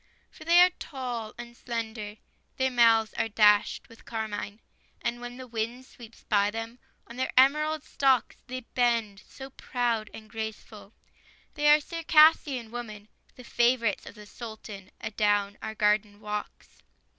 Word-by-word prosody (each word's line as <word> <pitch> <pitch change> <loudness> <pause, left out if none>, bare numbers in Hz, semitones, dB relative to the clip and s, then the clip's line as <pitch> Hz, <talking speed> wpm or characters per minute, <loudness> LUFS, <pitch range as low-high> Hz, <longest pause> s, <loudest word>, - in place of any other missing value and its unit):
For 310 - -14
they 340 +1 +6
are 365 0 +6
tall 245 -6 -5
and 240 0 -9
slender; 220 -3 -5 0.4
Their 260 0 +1
mouths 230 -2 +4
are 225 - 0
dashed 210 -1 +3
with 230 -1 -17
carmine; 220 -2 -5 0.4
And 240 0 -3
when 245 0 -7
the 260 - -8
wind 235 +2 -4
sweeps 235 -3 -15
by 205 -1 +2
them, 225 +3 -6 0.3
On 235 - -12
their 260 - -1
emerald 300 +3 +4
stalks 265 -3 +1
They 255 +1 -5
bend 230 -5 +1
so 270 0 -10
proud 235 -4 -2
and 220 -1 -11
graceful 220 -1 -8 0.6
They 295 -1 +2
are 300 +1 +7
Circassian 305 -6 +3
women, 215 -3 -8 0.3
The 250 - -12
favorites 235 -2 +1
of - - -10
the 210 -1 -12
Sultan, 215 -3 -9
Adown 205 -1 0
our 220 - -5
garden 210 -1 +1
walks! 210 0 -7
230 Hz, 145 wpm, -28 LUFS, 215-255 Hz, 0.6 s, are